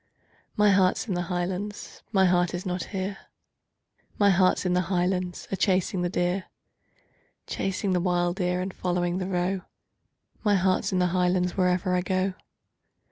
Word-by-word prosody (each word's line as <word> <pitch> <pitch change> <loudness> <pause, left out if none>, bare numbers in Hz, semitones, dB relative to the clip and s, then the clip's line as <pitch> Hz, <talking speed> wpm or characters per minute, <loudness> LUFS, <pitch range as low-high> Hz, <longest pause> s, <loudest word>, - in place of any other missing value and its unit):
Chorus.—My 210 -1 +5
heart's 190 +4 +2
in 200 - -1
the 175 - -1
Highlands, 185 +3 -4
my 190 -3 +4
heart 180 -1 +2
is 175 - -5
not 180 -1 -2
here, 195 0 -4 1.0
My 200 -1 +5
heart's 185 0 +3
in 180 - +1
the 180 - +3
Highlands, 180 -1 -1
a - - +1
chasing 185 -1 +1
the 175 - 0
deer; 180 +2 -1 1.0
Chasing 195 0 -2
the 180 - +2
wild 175 0 0
deer, 180 -1 0
and 185 +1 -4
following 175 0 -1
the 185 - -3
roe, 185 +1 -1 0.8
My 205 -2 +3
heart's 185 0 +1
in 185 - 0
the 180 0 +2
Highlands, 180 0 +1
wherever 180 0 +1
I 180 - +2
go. 185 +1 0
185 Hz, 160 wpm, -26 LUFS, 180-190 Hz, 1.0 s, Chorus.—My